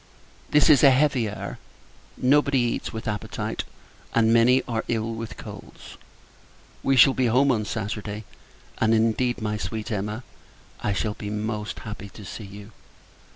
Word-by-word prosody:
This 150 0 +5
is 150 -2 +6
a 140 - +9
heavy 130 -4 +2
air; 105 - -6 0.6
nobody 140 +1 +3
eats 120 -2 -1
with 110 0 -6
appetite, 105 -1 -3 0.5
and 115 -1 +4
many 125 +3 +5
are 115 -2 -2
ill 115 -1 -1
with 115 0 -6
colds. - - -11 0.9
We 135 - +2
shall 130 +1 +7
be 130 -2 +1
home 130 +4 +4
on 110 -4 0
Saturday; 105 0 -4 0.6
and, 110 0 +3
indeed, 115 +2 +1
my 105 0 -1
sweet 110 +2 -4
Emma, 105 +3 -3 0.6
I 100 - 0
shall 105 +1 -1
be 105 0 -7
most 105 0 -3
happy 105 -2 -7
to 105 +1 -12
see 105 - -7
you. 100 +2 -11
110 Hz, 155 wpm, -25 LUFS, 105-125 Hz, 0.9 s, a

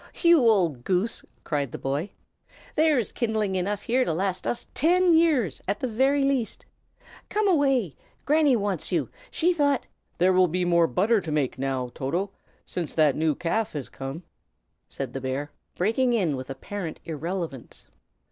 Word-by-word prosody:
"You 340 -1 +7
old 170 - +2
goose!" 190 - 0 0.2
cried 145 -5 -2
the - - -5
boy. 140 +8 -2 0.6
"There's 305 -8 +2
kindling 220 -4 -1
wood 190 - 0
enough 205 +3 -2
here 255 +2 +2
to 170 - -1
last 185 +3 -2
us 240 - -2
ten 355 +2 +4
years, 300 - +2
at 200 - -1
the 255 - -1
very 270 +5 +2
least. 270 -4 -1 0.6
Come 425 0 +1
away! 270 - +2 0.3
Granny 295 -2 +4
wants 200 -6 -2
you. - - 0 0.2
She 350 +2 +1
thought 285 -5 +1 0.2
" - - -45
"There 185 +2 +4
will 185 0 +5
be 180 +2 -1
more 170 -1 +4
butter 210 +5 +2
to 160 - -5
make, 145 -4 -1
now, 130 -2 -2
Toto, 175 +9 -2 0.3
since 170 -4 -4
that 155 -4 +4
new 155 -1 +1
calf 215 +6 -1
has 145 -4 -5
come," 135 +6 -7 0.7
said 135 -3 -5
the 135 - -4
bear, 135 +3 -3 0.2
breaking 235 +7 +1
in 175 -10 +1
with 130 0 -7
apparent 165 +6 -6
irrelevance. 165 -3 -5
190 Hz, 165 wpm, -26 LUFS, 155-255 Hz, 0.7 s, You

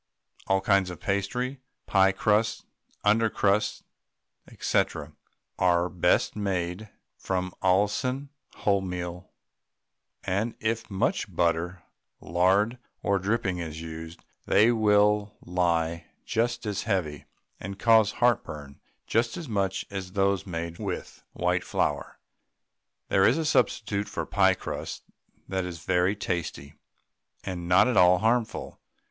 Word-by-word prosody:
All 95 0 +2
kinds 100 -1 +3
of 90 - -8
pastry, 125 +7 -2 0.2
pie 95 -1 +4
crusts, 105 +3 +1 0.4
under 110 +2 +4
crusts, 105 +1 +1 0.8
&c., - - +3 0.8
are 90 -1 +3
best 90 -1 +2
made 95 0 -2 0.3
from 90 -1 -3
Allinson 105 +9 +1 0.4
wholemeal, 90 -2 -1 1.0
and 100 +5 -1
if 115 +1 -2
much 95 -2 -1
butter, 85 +1 0 0.4
lard, 95 +8 +2 0.2
or 100 -1 +2
dripping 95 -2 -1
is 80 -2 -5
used 80 0 -8 0.2
they 110 +3 +5
will 105 -2 +3
lie 85 -2 0 0.2
just 120 +1 -1
as 105 -2 -2
heavy, 80 -7 -2 0.3
and 100 +1 -6
cause 110 -1 +4
heartburn 75 - -1 0.3
just 115 +1 0
as 170 -3 -6
much 100 -4 -1
as 95 -2 -5
those 100 -1 +1
made 85 -1 -5
with - - -5
white - - 0
flour. - - -2 0.9
There 95 - +5
is - - +3
a 165 - -1
substitute 105 -8 +1
for - - -3
pie - - +3
crusts - - -6 0.4
that 95 -1 -1
is 85 -2 -7
very 95 +2 +2
tasty, 85 -8 -4 0.7
and 90 -3 -5
not 90 +7 +5
at 125 - +1
all 90 0 +7
harmful. 115 +3 -1
95 Hz, 120 wpm, -27 LUFS, 90-105 Hz, 1.0 s, all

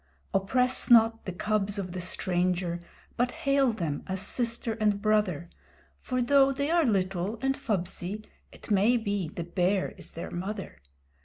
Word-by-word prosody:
Oppress 250 +8 +1
not 225 -1 +5
the 185 - -3
cubs 205 +2 -1
of 185 -3 -4
the 180 0 -4
stranger, 180 -1 -1 0.4
but 245 +1 +2
hail 275 -1 +2
them 165 -10 -3
as 190 0 -2
Sister 230 +2 -1
and 210 -1 +2
Brother, 210 -6 +1 0.5
For 255 -1 -1
though 275 +2 +5
they 280 +3 -1
are 340 -2 +4
little 195 -1 0
and 270 +2 0
fubsy, 210 -4 -3 0.3
it - - -12
may 210 +5 +4
be 200 -5 -2
the 170 - -5
Bear 180 +3 0
is - - -7
their 165 - -6
mother. 195 - -5
205 Hz, 155 wpm, -28 LUFS, 185-240 Hz, 0.5 s, not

